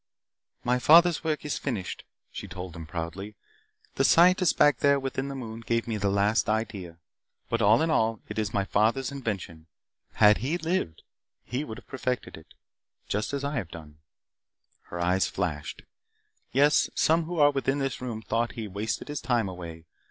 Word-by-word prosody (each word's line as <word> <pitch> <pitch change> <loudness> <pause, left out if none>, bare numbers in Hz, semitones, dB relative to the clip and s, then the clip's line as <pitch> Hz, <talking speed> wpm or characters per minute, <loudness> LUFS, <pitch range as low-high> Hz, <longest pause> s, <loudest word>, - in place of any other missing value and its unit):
"My 125 +1 +1
father's 170 +5 +6
work 155 -2 -2
is 150 - -2
finished," 110 -10 -4 0.3
she - - -7
told 90 -2 -7
them 80 -2 -9
proudly. 90 +5 -6 0.6
"The - - +3
Scientist 180 +1 +5
back 145 -4 +5
there 140 0 +4
within 135 0 -3
the 140 - -5
moon 115 -4 -6
gave 115 0 -1
me 110 -2 -2
the 100 -1 0
last 100 +3 +2
idea. 105 -6 -3 0.5
But, 115 0 0
all 110 +6 +5
in 165 - +1
all, 110 -6 +1
it - - -4
is 110 - -1
my 100 - 0
father's 115 +8 +1
invention. 100 - -5 0.5
Had 105 0 +5
he 140 +9 -1
lived, 160 - -2 0.4
he 130 +4 -3
would 110 -7 -7
have - - -13
perfected 125 -2 -3
it. 80 - -16 0.5
Just 105 +1 -2
as 140 0 -3
I 140 +1 -2
have 95 -9 -3
done." 75 -3 -12 0.9
Her 85 - -7
eyes 90 +2 +2
flashed. 75 -3 -4 0.7
"Yes, 145 +3 +4
some 165 +1 +3
who 175 +1 -5
are 145 -1 +6
within 135 0 0
this 135 -3 -2
room 115 -3 -5
thought 115 +1 0
that - - -14
he 115 -3 -5
wasted 105 +3 -4
his 145 -2 -4
time 120 -5 +1
away. 85 -3 -8
115 Hz, 180 wpm, -27 LUFS, 95-140 Hz, 0.9 s, father's